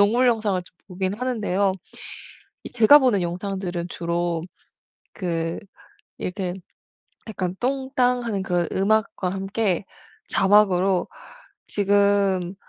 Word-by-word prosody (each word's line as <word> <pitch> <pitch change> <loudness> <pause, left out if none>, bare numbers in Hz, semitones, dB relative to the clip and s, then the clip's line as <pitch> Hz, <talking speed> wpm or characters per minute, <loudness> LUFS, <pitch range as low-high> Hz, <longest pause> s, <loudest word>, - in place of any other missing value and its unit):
동물 230 +5 +4
영상을 215 -5 +1
좀 175 - -17
보기는 190 +3 -3
하는데요. 205 -6 0 0.9
이 - - -9
제가 245 +5 +7
보는 245 -8 +2
영상들은 180 0 -3
주로 170 -1 -2 0.7
그 165 -3 -2 0.6
이렇게 180 -1 -3 0.8
약간 185 -4 -3
똥땅하는 250 -5 0
그런 175 -2 0
음악과 205 -1 +1
함께 195 0 -1 0.4
자막으로 195 -2 +3 0.6
'지금 200 -2 +2
195 Hz, 220 characters per minute, -23 LUFS, 180-220 Hz, 0.9 s, 제가